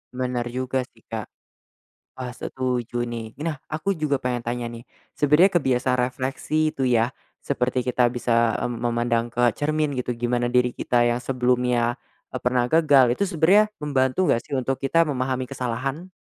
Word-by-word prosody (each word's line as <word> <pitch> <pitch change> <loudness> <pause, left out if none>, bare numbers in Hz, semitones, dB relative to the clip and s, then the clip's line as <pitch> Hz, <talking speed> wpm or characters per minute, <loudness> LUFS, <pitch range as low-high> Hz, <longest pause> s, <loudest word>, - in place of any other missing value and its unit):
Bener 125 -1 -2
juga, 130 +2 -2
sih, - - -25
Kak. - - -6 0.9
Wah, 125 -1 -5
setuju, 120 -1 -3
nih. 115 -2 -6
Nah, 155 -4 -3
aku 160 +6 -1
juga 155 -5 0
pengen 125 -2 -2
tanya, 120 +1 -3
nih. 115 0 -9 0.3
Sebenarnya 150 +7 +4
kebiasa 130 -6 +1
refleksi 135 +5 -1
itu, 135 - -4
ya, 120 0 +2 0.3
seperti 125 0 0
kita 125 -1 +2
bisa, 115 -1 +1
eee, - - -1
memandang 120 0 0
ke 120 0 +2
cermin 150 +2 -1
gitu, 125 -2 -3
gimana 120 0 0
diri 125 0 +2
kita 120 0 +1
yang 120 0 +1
sebelumnya, 125 -1 +1 0.4
eee, 130 - -4
pernah 125 0 +1
gagal. 150 -5 +6
Itu 125 - -2
sebenarnya 185 +6 +4
membantu 130 -2 +1
enggak, 115 - +1
sih, - - -3
untuk 130 +1 -1
kita 165 +5 +3
memahami 130 -3 -1
kesalahan? 130 +5 -4
125 Hz, 160 wpm, -24 LUFS, 120-140 Hz, 0.9 s, gagal